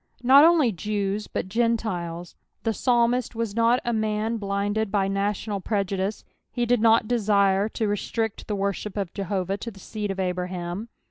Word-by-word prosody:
Not 270 +4 +8
only 320 -7 +5
Jews, 205 +2 -2
but - - -3
Gentiles. 190 -6 -1 0.3
The 225 - 0
psalmist 240 +1 +1
was 225 -3 -3
not 230 +2 +3
a 240 - 0
man 220 +1 -1
blinded 205 +1 -1
by 200 -2 +1
national 200 +1 -2
prejudice, 195 0 -2 0.3
he 240 -1 -1
did 240 -1 +2
not 225 -1 +4
desire 200 -3 +2
to 220 0 -2
restrict 220 +2 -2
the 210 - -1
worship 200 +1 -3
of 195 -4 -3
Jehovah 195 -1 -2
to 230 - -6
the 200 -3 -13
seed 210 +2 -5
of 195 0 -3
Abraham. 180 +2 -3
210 Hz, 160 wpm, -25 LUFS, 195-230 Hz, 0.3 s, Not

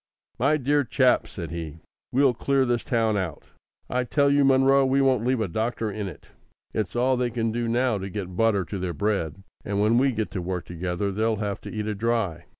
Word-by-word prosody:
"My 140 +5 +3
dear 145 +1 +2
chap!" 130 0 +2
said 85 -5 -7
he. 80 -2 -6 0.3
"We'll 135 0 +4
clear 135 +3 +1
this 120 -2 0
town 115 -6 +1
out. 90 -6 -3 0.4
I 125 0 0
tell 140 +3 +2
you, 140 0 +4
Munro, 135 0 +5
we 135 +1 +2
won't 130 -4 +3
leave 125 0 +1
a 110 - 0
doctor 110 +3 -2
in 105 0 -4
it. 95 - -10 0.5
It's 110 -1 -2
all 130 +2 +2
they 125 0 0
can 115 -1 -1
do 120 +1 -2
now 120 -2 +1
to 95 +1 -5
get 95 -2 -5
butter 100 -2 +2
to 100 - -5
their 90 -1 -3
bread; 95 -3 -1 0.2
and 100 0 -2
when 110 +3 +4
we 135 +1 +3
get 110 -3 -3
to 95 - -3
work 90 0 -3
together 90 +3 -3
they'll 110 +3 0
have 100 -2 -3
to - - -8
eat 105 -1 -3
it 105 -2 -3
dry. 110 -8 -1
110 Hz, 220 wpm, -25 LUFS, 100-125 Hz, 0.5 s, Munro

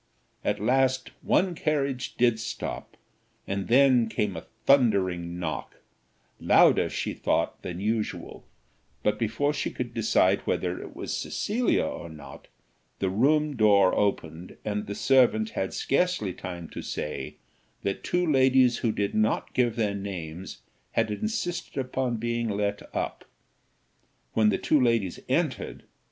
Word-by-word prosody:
At 105 0 0
last 130 +3 +1
one 185 -1 +2
carriage 140 -6 -1
did 120 -2 +3
stop, 110 - -5 0.5
and 95 0 -3
then 125 -2 +5
came 105 -3 -1
a - - -8 0.2
thundering 95 -10 +3
knock 80 -3 -4 0.6
louder, - - +5
she - - -3
thought, - - -1
than 90 -1 -6
usual; 110 +2 -3 0.6
but 105 - +1
before 115 +6 0
she 145 - -2
could 120 -1 -5
decide 100 -4 +3
whether 90 -1 -1
it - - -10
was - - -4
Cecilia 235 +4 0
or 85 - -5
not, 75 -2 -12 0.5
the 95 -1 -1
room 150 +7 +2
door 100 -4 +5
opened, 85 -4 -2
and 105 0 -2
the 100 - -4
servant 120 -5 +3
had 95 - -2
scarcely 140 - 0
time 85 -2 -7
to - - -7
say, 75 - -5 0.5
that 100 - -2
two 180 0 +1
ladies 130 -4 +4
who 115 - +1
did 100 -1 -2
not 110 0 0
give 120 -3 +2
their 110 -4 0
names 95 -3 -6 0.3
had 110 - +1
insisted 175 - -3
upon 130 -2 -1
being 120 0 -1
let 100 0 -1
up - - -3 1.1
when 110 -1 +4
the 100 - +1
two 150 - +2
ladies 115 -7 +1
entered. - - -1
110 Hz, 140 wpm, -27 LUFS, 100-130 Hz, 1.1 s, then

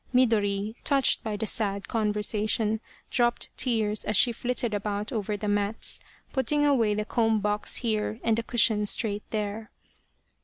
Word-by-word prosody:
Midori, 210 -4 +2
touched 275 -3 +3
by 215 -2 -3
the 220 - -2
sad 200 -2 0
conversation, 215 0 0 0.3
dropped 240 -1 0
tears 220 -4 +1
as 210 - +2
she 240 - +5
flitted 240 -1 -1
about 205 +2 -3
over 210 -3 -2
the 210 - -5
mats, 205 +1 -1 0.3
putting 290 +2 +1
away 235 -8 +2
the 210 0 -2
comb 225 -1 +1
box 210 +1 +1
here 220 -1 -1
and 225 0 +1
a - - 0
cushion 220 -3 +2
straight 205 -1 0
there. 215 0 -4
215 Hz, 150 wpm, -27 LUFS, 210-230 Hz, 0.3 s, she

